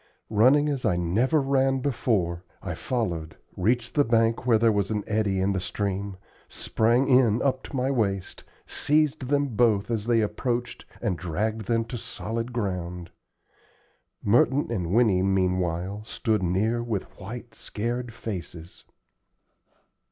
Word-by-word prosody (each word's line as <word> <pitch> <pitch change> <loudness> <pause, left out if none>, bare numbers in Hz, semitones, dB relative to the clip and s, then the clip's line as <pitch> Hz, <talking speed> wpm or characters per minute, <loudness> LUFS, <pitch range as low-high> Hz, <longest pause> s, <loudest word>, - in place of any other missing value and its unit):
Running 130 +8 +5
as 140 -3 -2
I 105 -6 +2
never 105 - +2
ran 135 -1 +2
before, 110 -10 0 0.2
I - - -3
followed, 85 -11 -3 0.2
reached 115 +5 0
the 145 - +4
bank 115 0 +1
where 115 -3 +5
there 115 0 +4
was 100 -2 0
an 105 -2 -1
eddy 105 -3 0
in 95 +1 +1
the 95 - -1
stream, 100 +1 -3 0.3
sprang 120 +4 +1
in 125 -4 +4
up 130 -1 +1
to - - -8
my 130 +1 +1
waist, 100 -7 -1 0.2
seized 150 -3 +1
them 145 +1 +1
both 110 -2 +2
as 110 -1 -2
they 115 -1 +3
approached 120 +3 -2 0.2
and 95 -8 -1
dragged 105 +6 -2
them 115 -1 +1
to 120 0 -6
solid 115 +3 -4
ground. 90 -6 -4 1.1
Merton 120 +6 +3
and 90 -7 -2
Winnie 105 -4 +4
meanwhile 95 0 0
stood 110 -1 -1
near 100 +7 +1
with 115 -5 -2 0.2
white, 115 +4 -8
scared 120 +3 -4
faces. 90 -7 -8
110 Hz, 140 wpm, -26 LUFS, 95-125 Hz, 1.1 s, Running